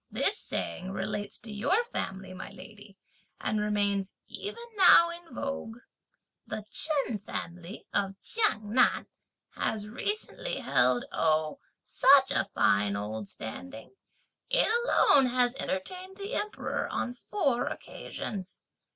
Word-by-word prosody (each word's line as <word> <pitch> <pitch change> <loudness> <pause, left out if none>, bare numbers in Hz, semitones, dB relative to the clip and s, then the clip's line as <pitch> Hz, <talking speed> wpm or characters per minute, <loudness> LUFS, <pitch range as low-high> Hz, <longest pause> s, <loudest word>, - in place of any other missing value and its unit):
This - - +1
saying 185 - -4
relates 205 +1 -3
to 225 - -9
your 245 - +2
family, 190 - -4
my 185 - -7
lady, 200 +1 -13 0.4
and 215 -1 0
remains 200 -2 0
even 420 +3 -6
now 350 -3 +8
in 340 -2 -11
vogue. 275 -5 -4 0.7
The 215 - -5
Chen 280 -8 0
family 180 -1 -7
of 195 -1 0
Chiang 220 - 0
Nan 250 0 +4 0.5
has 210 -1 -2
recently 430 - -3
held, 125 0 +3
oh 155 -1 +1 0.2
such - - +6
a - - +1
fine 100 0 +3
old 105 +1 -4
standing! 110 - -8 0.6
it - - +4 0.2
alone 280 - +5
has 245 0 +2
entertained 370 - -3
the 400 +4 -5
Emperor 420 0 -2
on 245 - -2
four 255 -3 0
occasions! 190 -3 -6
210 Hz, 120 wpm, -29 LUFS, -, 0.7 s, now